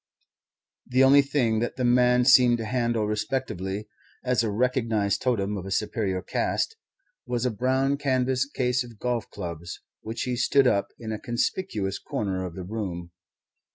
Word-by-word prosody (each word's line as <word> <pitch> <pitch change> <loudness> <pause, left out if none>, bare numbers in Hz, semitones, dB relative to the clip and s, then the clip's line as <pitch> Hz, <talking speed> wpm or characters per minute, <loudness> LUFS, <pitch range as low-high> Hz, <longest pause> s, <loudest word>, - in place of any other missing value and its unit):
The 130 +1 +3
only 140 +2 +7
thing 135 -6 +1
that 120 - -2
the 125 - -1
man 125 0 +4
seemed 125 -2 +6
to 115 - -4
handle 120 -2 0
respectfully 105 -2 -3 0.4
as 125 -1 +2
a 115 - 0
recognized 115 -3 0
totem 105 -5 0
of 95 0 -6
a - - -5
superior 95 -1 -1
caste 450 - -1 0.5
was 120 0 -1
a 125 - +1
brown 130 +5 +1
canvas 130 -1 +1
case 125 -2 0
of 120 -3 -13
golf 120 -1 -2
clubs, 85 -3 -7 0.2
which 110 +2 -4
he 125 -1 -1
stood 140 +3 +3
up 100 -5 +2
in 110 -1 -6
a 110 - -3
conspicuous 120 - -2
corner 95 -3 -3
of 85 - -10
the 95 - -6
room. 90 -4 -5
120 Hz, 160 wpm, -26 LUFS, 100-125 Hz, 0.5 s, only